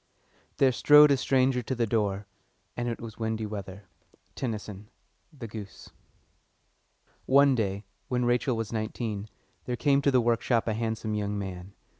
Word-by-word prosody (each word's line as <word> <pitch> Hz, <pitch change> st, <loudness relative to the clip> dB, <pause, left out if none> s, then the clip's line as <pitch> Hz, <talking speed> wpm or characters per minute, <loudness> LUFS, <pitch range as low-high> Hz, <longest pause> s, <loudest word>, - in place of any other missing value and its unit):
"There 135 Hz, -1 st, +4 dB
strode 150 Hz, +3 st, +7 dB
a -, -, +5 dB
stranger 130 Hz, -1 st, +2 dB
to 130 Hz, +3 st, -3 dB
the 120 Hz, -1 st, +1 dB
door, 105 Hz, -2 st, -1 dB, 0.5 s
And 120 Hz, 0 st, -2 dB
it 115 Hz, -, -4 dB
was 115 Hz, -1 st, -9 dB
windy 110 Hz, -1 st, -2 dB
weather." 100 Hz, -2 st, -7 dB, 0.5 s
TENNYSON: 105 Hz, -4 st, -5 dB, 0.4 s
The 130 Hz, -7 st, -9 dB
Goose. 105 Hz, -2 st, -10 dB, 1.4 s
One 140 Hz, +1 st, +5 dB
day, 100 Hz, -4 st, -2 dB, 0.2 s
when 125 Hz, -1 st, 0 dB
Rachel 120 Hz, 0 st, +1 dB
was 115 Hz, 0 st, -4 dB
nineteen, 110 Hz, -1 st, -4 dB, 0.4 s
there 125 Hz, -, -2 dB
came 140 Hz, 0 st, +3 dB
to 140 Hz, -, +2 dB
the 130 Hz, -2 st, +4 dB
workshop 120 Hz, 0 st, +1 dB
a 110 Hz, -, +1 dB
handsome 110 Hz, -1 st, -3 dB
young 105 Hz, -1 st, -2 dB
man. 95 Hz, -1 st, -6 dB
115 Hz, 150 wpm, -28 LUFS, 105-125 Hz, 1.4 s, strode